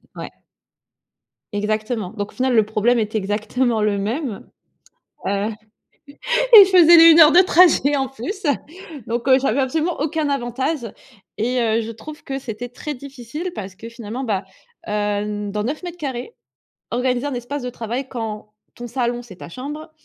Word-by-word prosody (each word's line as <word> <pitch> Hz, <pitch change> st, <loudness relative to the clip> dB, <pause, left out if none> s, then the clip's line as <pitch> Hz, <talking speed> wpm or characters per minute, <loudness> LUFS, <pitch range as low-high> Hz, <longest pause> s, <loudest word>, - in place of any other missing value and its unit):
Ouais. -, -, -7 dB, 1.2 s
Exactement 215 Hz, 0 st, -2 dB
donc 205 Hz, -2 st, -5 dB
au -, -, -23 dB
final, 255 Hz, -1 st, +1 dB
le 220 Hz, -, +4 dB
problème 220 Hz, +3 st, +1 dB
était 220 Hz, 0 st, -1 dB
exactement 215 Hz, +3 st, -1 dB
le 210 Hz, -1 st, +1 dB
même, 225 Hz, +3 st, -4 dB, 0.8 s
heu, -, -, 0 dB, 1.2 s
et 410 Hz, -3 st, +12 dB
je 380 Hz, -, -4 dB
faisais 345 Hz, -2 st, +8 dB
les 330 Hz, 0 st, +8 dB
heures 305 Hz, 0 st, +8 dB
de 350 Hz, -, +7 dB
trajet 335 Hz, -6 st, +4 dB
en 270 Hz, -1 st, 0 dB
plus, 270 Hz, -, -7 dB, 0.6 s
donc 235 Hz, +3 st, -3 dB
heu, 260 Hz, 0 st, +6 dB
j'avais 270 Hz, 0 st, 0 dB
absolument 315 Hz, +6 st, -1 dB
aucun 300 Hz, 0 st, -1 dB
avantage 265 Hz, +3 st, -2 dB, 0.6 s
et 245 Hz, +3 st, 0 dB
heu, 225 Hz, 0 st, +1 dB
je 230 Hz, +1 st, -6 dB
trouve 300 Hz, +8 st, -11 dB
que 270 Hz, 0 st, -4 dB
c'était 240 Hz, 0 st, -6 dB
très 295 Hz, +4 st, -6 dB
difficile 280 Hz, +5 st, -7 dB
parce 190 Hz, -2 st, -7 dB
que 230 Hz, +4 st, -10 dB
finalement, 230 Hz, +2 st, -6 dB
bah, 205 Hz, -6 st, -1 dB, 0.4 s
heu, 210 Hz, 0 st, -2 dB
dans 210 Hz, +1 st, -2 dB
9 280 Hz, +7 st, -3 dB
mètres 350 Hz, 0 st, -7 dB
carrés, 260 Hz, -5 st, -5 dB, 0.6 s
organiser 250 Hz, +3 st, 0 dB
un 285 Hz, -, -3 dB
espace 250 Hz, +4 st, -5 dB
de 250 Hz, -, -4 dB
travail 245 Hz, +3 st, -5 dB
quand 215 Hz, -3 st, -6 dB, 0.2 s
ton 240 Hz, -, -8 dB
salon, 240 Hz, 0 st, -2 dB
c'est 200 Hz, -7 st, -13 dB
ta -, -, -10 dB
chambre, 295 Hz, -, -8 dB
245 Hz, 165 wpm, -20 LUFS, 215-280 Hz, 1.2 s, et